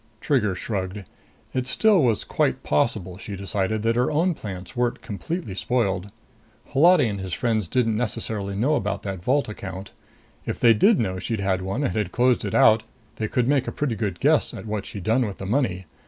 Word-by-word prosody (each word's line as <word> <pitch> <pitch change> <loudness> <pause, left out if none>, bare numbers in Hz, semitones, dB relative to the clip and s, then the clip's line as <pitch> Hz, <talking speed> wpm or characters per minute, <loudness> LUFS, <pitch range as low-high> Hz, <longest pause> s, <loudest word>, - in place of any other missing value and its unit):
Trigger 105 -8 +1
shrugged. 95 -1 -4 0.5
It 130 -1 -1
still 205 +6 +4
was 115 -4 +2
quite - - 0
possible, 90 +3 0
she 105 -2 -6
decided, 100 +2 -2
that 115 0 +2
her 125 +1 +2
own 170 +4 +2
plans 95 - -8
weren't 120 -1 -1
completely 125 - -4
spoiled. 100 -3 -1 0.6
Holati 165 0 +5
and 100 -2 -3
his 95 -3 -4
friends 110 -5 0
didn't 115 0 +1
necessarily 110 -4 -2
know 125 +9 +1
about 105 -8 -1
that 95 -3 -5
vault 140 +6 +2
account. 95 -2 -7 0.5
If - - -4
they 115 -1 +6
did 200 - +4
know 95 -4 -1
she'd 110 +3 -3
had 95 -1 0
one 95 +9 -2
and 130 - -1
had 105 -5 -1
closed 125 +2 +2
it 100 - -3
out, 110 0 +6 0.4
they 110 - -1
could 125 +1 0
make 140 -2 +2
a - - -2
pretty 140 -6 -2
good 105 -6 -3
guess - - +2
at - - -8
what 105 -2 -3
she'd 100 - -7
done 115 +6 +2
with 100 - -7
the 95 - -6
money. 95 -5 0
110 Hz, 200 wpm, -24 LUFS, 95-125 Hz, 0.6 s, they